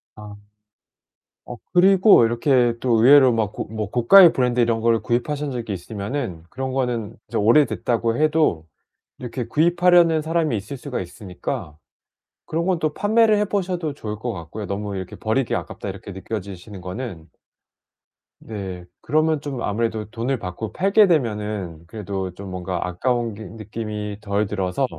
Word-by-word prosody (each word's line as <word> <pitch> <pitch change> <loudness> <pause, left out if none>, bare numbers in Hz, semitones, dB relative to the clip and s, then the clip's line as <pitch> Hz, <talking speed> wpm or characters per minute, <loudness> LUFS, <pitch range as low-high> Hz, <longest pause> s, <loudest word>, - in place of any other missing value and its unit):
아. 105 -1 -10 1.1
어 120 - -5 0.2
그리고 190 - +6
이렇게 120 +1 +2
또 120 -3 +2
의외로 135 -1 +7
막 110 -3 -1
고 - - -4
뭐 110 -2 -4
고가의 165 - +7
브랜드 125 -1 +1
이런 115 -1 +2
거를 115 -1 +3
구입하신 140 +4 -1
적이 120 -4 -4
있으면은 100 - -5
그런 130 0 -4
거는 120 -4 -2
이제 - - -2
오래됐다고 115 -1 +2
해도 150 - +1 0.5
이렇게 125 -1 -5
구입하려는 170 +2 +4
사람이 160 -5 0
있을 105 +7 -6
수가 130 0 -5
있으니까 90 -5 -6 0.7
그런 165 +2 -1
건 185 -2 +1
또 155 -2 -1
판매를 215 +1 +3
해 210 - +2
보셔도 180 -6 -2
좋을 105 -6 -6
것 120 +2 -3
같고요, 95 +3 -7
너무 100 +1 -4
이렇게 95 -1 -6
'버리기 115 +3 -1
아깝다.' - - -6
이렇게 100 - -9
느껴지시는 95 0 -7
거는. 90 -3 -7 1.1
네. 95 -5 -7 0.2
그러면 155 +2 +1
좀 135 -5 -5
아무래도 110 0 -1
돈을 120 +4 -2
받고 100 +2 -6
팔게 200 +2 +4
되면은 105 - -1
그래도 95 -2 -5
좀 100 0 -8
뭔가 90 -1 -3
아까운 115 +5 -1
게 110 - -9
느낌이 105 0 -6
덜 100 0 0
들어서 95 +4 -1
115 Hz, 335 characters per minute, -22 LUFS, 100-145 Hz, 1.1 s, 의외로